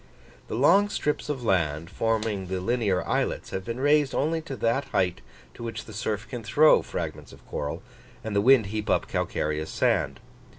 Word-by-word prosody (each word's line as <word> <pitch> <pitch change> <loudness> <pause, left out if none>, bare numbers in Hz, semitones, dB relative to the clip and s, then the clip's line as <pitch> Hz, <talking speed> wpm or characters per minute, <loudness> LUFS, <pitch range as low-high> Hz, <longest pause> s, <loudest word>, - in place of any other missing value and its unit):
The - - -4
long 185 - +5
strips 150 -6 -2
of 135 -4 -3
land, 85 -6 0
forming 110 -4 -1
the 95 0 -2
linear 100 -2 0
islets, - - -1
have 95 - -3
been 115 +4 -5
raised 145 0 +3
only 160 +3 0
to 155 -4 -6
that 115 +4 0
height 90 -7 0 0.3
to - - -12
which 115 -1 -5
the 110 - -11
surf 105 0 -3
can 120 +1 -6
throw 150 +8 +5
fragments - - -5
of - - -16
coral, 75 +6 -4 0.4
and 110 -2 -4
the 100 - +4
wind 125 0 +6
heap 105 -1 -3
up - - +2
calcareous 75 +1 -2
sand. - - +1
110 Hz, 180 wpm, -26 LUFS, 95-135 Hz, 0.4 s, wind